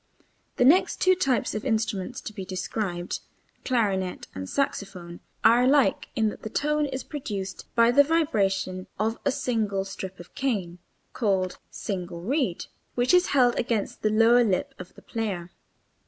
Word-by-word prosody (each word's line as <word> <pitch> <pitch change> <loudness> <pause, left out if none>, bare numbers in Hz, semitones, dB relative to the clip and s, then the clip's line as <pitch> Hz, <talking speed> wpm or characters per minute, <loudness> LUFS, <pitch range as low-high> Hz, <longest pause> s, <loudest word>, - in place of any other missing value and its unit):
The 245 - +3
next 340 +8 +4
two 370 - +5
types 270 - 0
of 215 - -3
instruments 225 -1 -1
to 215 - -7
be 195 - -6
described 185 -1 -3 0.4
(clarinet 195 -7 0
and 95 0 -6
saxophone) 185 -10 -3 0.2
are 235 +2 +6
alike 275 +1 +3
in 220 -1 +2
that - - -9
the 220 - -5
tone 300 +4 0
is 260 -1 -4
produced 200 -10 -5
by 230 0 +5
the 285 +4 +7
vibration 200 - 0
of 220 +2 -1
a 280 - +3
single 215 -7 -1
strip 190 -1 -7
of 175 - -12
cane 195 -10 -2 0.3
(called 190 -5 0
single 180 -4 -5
reed) 245 - 0 0.3
which 245 +6 +2
is 360 0 +5
held 245 -2 +4
against 230 -4 -1
the 215 - +2
lower 230 +3 +5
lip 190 -5 0
of 180 0 -10
the - - -15
player. 195 -6 -4
215 Hz, 155 wpm, -26 LUFS, 190-255 Hz, 0.4 s, the